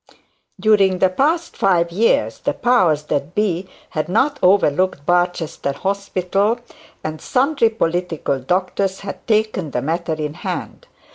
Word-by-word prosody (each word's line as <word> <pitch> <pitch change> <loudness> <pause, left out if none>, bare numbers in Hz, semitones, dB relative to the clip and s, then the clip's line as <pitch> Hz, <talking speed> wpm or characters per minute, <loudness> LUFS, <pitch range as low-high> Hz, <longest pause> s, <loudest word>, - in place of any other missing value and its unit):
During 200 -4 +4
the 185 0 +3
past 320 - 0
five 170 -3 +2
years 215 +7 +1
the - - -2
powers 180 -12 +2
that 145 +2 -3
be 190 -3 0 0.2
had 155 +1 -2
not 270 +8 +1
overlooked 185 -4 +2
Barchester 175 -5 0
Hospital, 195 - -1 0.4
and 155 0 -5
sundry 270 -2 +2
political 175 -8 -1
doctors 185 +6 -1
had 200 -1 -8
taken 215 -7 +1
the 125 - -2
matter 165 +2 -1
in 150 -1 -4
hand. - - -6
185 Hz, 130 wpm, -20 LUFS, 165-210 Hz, 0.4 s, During